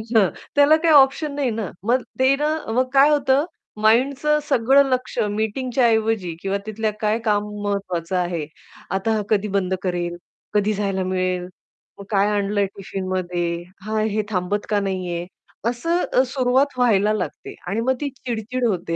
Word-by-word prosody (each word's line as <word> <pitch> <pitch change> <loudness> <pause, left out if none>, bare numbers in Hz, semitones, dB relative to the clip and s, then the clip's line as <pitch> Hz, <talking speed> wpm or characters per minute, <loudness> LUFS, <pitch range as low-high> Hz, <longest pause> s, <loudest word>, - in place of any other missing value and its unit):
हां, 200 -5 +5 0.3
त्याला 285 +2 +6
काही 330 - +4
ऑप्शन 280 +1 +4
नाही 275 -4 0
ना. 220 -4 -3
मग 245 +4 +2 0.2
ते 265 +1 +4
ना 305 +1 +1 0.2
मग 255 +2 +1
काय 275 +2 +6
होतं 285 0 +3 0.4
माइंडचं 275 +7 +3
सगळं 270 +2 +5
लक्ष्य 250 -3 -1
मीटिंगच्या 235 +4 0
ऐवजी 220 -6 0
किंवा 195 +1 -1
तिथलं 220 0 -2
काय 215 +1 +1
महत्त्वाचं 205 -4 -1
आहे? 175 -3 -1 0.5
आता 195 +4 0
हा 215 - 0
कधी 210 -1 +2
बंद 190 -1 -1
करेल, 175 -1 -2 0.4
कधी 210 +1 +2
जायला 195 -2 -1
मिळेल. 185 -1 -1 0.5
मग - - -7
काय 200 -1 +3
आणलंय 205 0 +1
टिफिनमध्ये? 180 -3 -3 0.2
हां, 215 0 0
हे 215 0 0
थांबत 200 +1 -1
का 210 - +2
नाहीये? 185 -3 -3 0.4
असं 295 +1 +1
सुरुवात 260 +1 +1
व्हायला 215 -4 +3
लागते 190 -4 -4
आणि 205 +5 -1
मग 260 +3 +2
ती 290 - -1
चिड-चिड 250 -1 -4
होते, 175 -5 -2
215 Hz, 150 wpm, -22 LUFS, 190-255 Hz, 0.5 s, त्याला